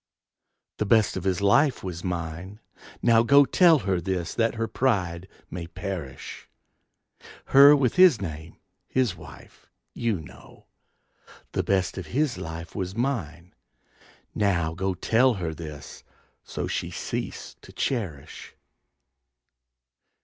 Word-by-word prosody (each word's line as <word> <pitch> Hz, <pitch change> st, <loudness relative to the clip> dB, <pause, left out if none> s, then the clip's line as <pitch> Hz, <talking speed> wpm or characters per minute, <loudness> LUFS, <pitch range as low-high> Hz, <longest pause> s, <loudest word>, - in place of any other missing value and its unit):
The 105 Hz, -, -1 dB
best 110 Hz, -1 st, +3 dB
of 95 Hz, -1 st, -5 dB
his 95 Hz, 0 st, 0 dB
life 125 Hz, +7 st, +3 dB
was 90 Hz, -2 st, -6 dB
mine. 90 Hz, +3 st, -5 dB, 0.4 s
Now 115 Hz, -1 st, +5 dB
go, 140 Hz, +4 st, +6 dB
Tell 170 Hz, +2 st, +5 dB
her 95 Hz, -3 st, 0 dB
this 90 Hz, -1 st, -3 dB
that 115 Hz, 0 st, 0 dB
her 115 Hz, 0 st, -2 dB
pride 95 Hz, -10 st, -1 dB, 0.2 s
may 85 Hz, -1 st, -6 dB
perish, 85 Hz, -5 st, -7 dB, 1.0 s
Her 140 Hz, +2 st, +8 dB
with 135 Hz, +1 st, 0 dB
his 180 Hz, -, +7 dB
name, 80 Hz, -3 st, -7 dB, 0.3 s
his 125 Hz, -8 st, 0 dB
wife, -, -, -15 dB, 0.2 s
you 115 Hz, -6 st, -1 dB
know! 80 Hz, -, -15 dB, 0.9 s
The -, -, 0 dB
best 95 Hz, -1 st, 0 dB
of 90 Hz, -, -8 dB
his 150 Hz, -4 st, 0 dB
life 80 Hz, +1 st, -7 dB
was 95 Hz, -1 st, -4 dB
mine. 100 Hz, -, -3 dB, 0.8 s
Now 85 Hz, -6 st, 0 dB
go, 95 Hz, +2 st, -2 dB
Tell 115 Hz, +7 st, +2 dB
her 85 Hz, -5 st, -4 dB
this 75 Hz, -3 st, -10 dB, 0.4 s
so -, -, -5 dB
she -, -, -3 dB
cease -, -, -5 dB
to -, -, -14 dB
cherish. 95 Hz, -, -4 dB
95 Hz, 125 wpm, -25 LUFS, 85-120 Hz, 1.0 s, Her